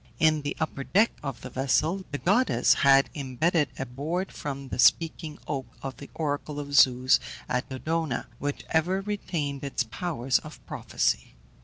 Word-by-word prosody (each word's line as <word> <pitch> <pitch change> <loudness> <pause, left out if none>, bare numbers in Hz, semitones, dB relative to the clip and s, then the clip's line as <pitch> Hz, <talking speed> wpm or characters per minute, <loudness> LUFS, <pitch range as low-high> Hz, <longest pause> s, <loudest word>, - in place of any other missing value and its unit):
In 155 -1 +3
the 145 0 -4
upper 155 -3 -2
deck 210 - +3
of 135 -4 -5
the - - -8
vessel 155 +8 +1
the 145 - -3
goddess 205 - +3
had 135 0 +5
imbedded 145 +3 +1
a 135 - -3
board 155 +9 -3
from 140 -2 -6
the - - -5
speaking 160 +1 +3
oak 135 -4 -3 0.2
of 135 -1 -5
the 140 - -10
oracle 145 -1 -2
of 145 -1 -6
Zeus 130 -1 +6 0.3
at 125 0 -1
Dodona, 155 +1 -2
which 145 0 -3
ever 180 +4 +2
retained 165 -9 -3
its 140 -2 -1
powers 130 0 -1
of 155 - -11
prophecy. - - -1
145 Hz, 160 wpm, -27 LUFS, 135-165 Hz, 0.3 s, Zeus